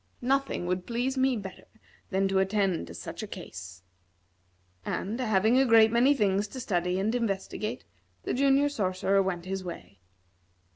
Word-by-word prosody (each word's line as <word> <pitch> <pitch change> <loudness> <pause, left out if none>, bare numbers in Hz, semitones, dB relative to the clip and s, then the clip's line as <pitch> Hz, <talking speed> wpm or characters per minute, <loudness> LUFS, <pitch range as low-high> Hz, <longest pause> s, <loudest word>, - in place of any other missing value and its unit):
Nothing 270 -6 0
would 180 0 -2
please 245 +3 -1
me 260 -1 +2
better 195 -3 -8 0.4
than 195 0 +1
to 195 0 +2
attend 190 - 0
to 85 - -9
such - - -7
a - - -5
case." 90 0 -9 1.0
And, 210 - -3
having 220 +1 +3
a 270 - +4
great 225 -1 +6
many 250 +5 +4
things 205 -3 +1
to 260 - -8
study 180 -5 -1
and 210 +4 0
investigate, 215 0 -3 0.4
the - - -2
Junior 275 +2 +3
Sorcerer 195 -6 +1
went 180 -2 -2
his 190 0 -4
way. 170 - -9
200 Hz, 155 wpm, -28 LUFS, 185-245 Hz, 1.0 s, great